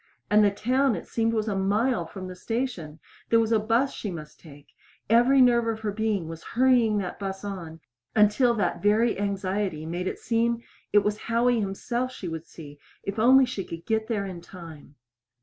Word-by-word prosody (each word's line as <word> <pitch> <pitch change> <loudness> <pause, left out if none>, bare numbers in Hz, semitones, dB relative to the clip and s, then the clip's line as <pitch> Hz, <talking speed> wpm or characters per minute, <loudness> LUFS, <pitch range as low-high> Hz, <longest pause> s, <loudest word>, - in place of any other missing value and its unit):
And 210 0 +6
the 205 - +5
town, 250 +5 +1
it - - -7
seemed, 225 0 0
was 220 -1 -1
a 205 - -1
mile 200 0 +1
from 185 +2 -8
the 185 - -8
station! 205 -8 -4 0.3
There 230 - +5
was 225 0 +1
a 225 - +4
bus 230 +6 +1
she 210 - -5
must 155 -4 -9
take. 145 -3 -15 0.4
Every 250 +4 +5
nerve 240 -2 +4
of 220 -1 -2
her 215 -2 -2
being 210 -4 -1
was 165 0 -8
hurrying 245 -4 +4
that 185 -3 -4
bus 195 0 -5
on 170 -5 -7 0.3
until 220 +3 +4
that 200 -5 -1
very 215 +2 +2
anxiety 195 -4 -2
made 175 +3 -3
it - - -3
seem 235 +1 0 0.3
it 205 0 +5
was 210 0 -1
Howie 235 +1 +2
himself 235 +5 -2
she 200 -7 -7
would 165 0 -6
see 145 -3 -12 0.2
if 200 +2 -4
only 260 +4 +6
she 245 -6 -4
could 165 -1 -9
get 220 0 0
there 210 -4 -1
in 180 -3 -7
time. 165 -5 -12
210 Hz, 195 wpm, -26 LUFS, 185-230 Hz, 0.4 s, And